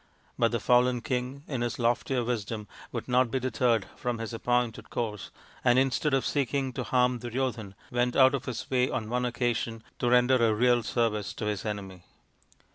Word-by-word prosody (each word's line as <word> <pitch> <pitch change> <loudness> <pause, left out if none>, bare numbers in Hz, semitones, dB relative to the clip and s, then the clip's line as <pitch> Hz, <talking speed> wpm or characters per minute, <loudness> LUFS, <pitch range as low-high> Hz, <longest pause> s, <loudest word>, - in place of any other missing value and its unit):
But 115 -1 +3
the 120 - 0
fallen 125 +1 +3
king 125 +3 -3
in 130 -5 -3
his 120 -1 -2
loftier 120 +2 +1
wisdom 110 -2 -3 0.2
would - - -5
not 125 0 +3
be 130 - -1
deterred 120 -4 +1
from 120 -1 -2
his 115 0 -5
appointed 120 0 -1
course, 105 -4 -3 0.3
and 120 0 +4
instead 135 +2 +2
of 135 - 0
seeking 135 -1 0
to - - -3
harm 125 -1 +2
Duryodhan 120 -4 -3 0.2
went 120 0 +1
out 130 0 +6
of 135 -2 -2
his 120 -3 -5
way 125 0 +2
on 110 -3 -3
one 125 0 0
occasion 120 -2 -1 0.2
to 120 - +1
render 125 +1 +5
a 110 -2 +3
real 120 +1 +3
service 110 -2 -1
to - - -4
his 105 -1 -2
enemy. 95 -4 -5
120 Hz, 185 wpm, -28 LUFS, 115-125 Hz, 0.3 s, out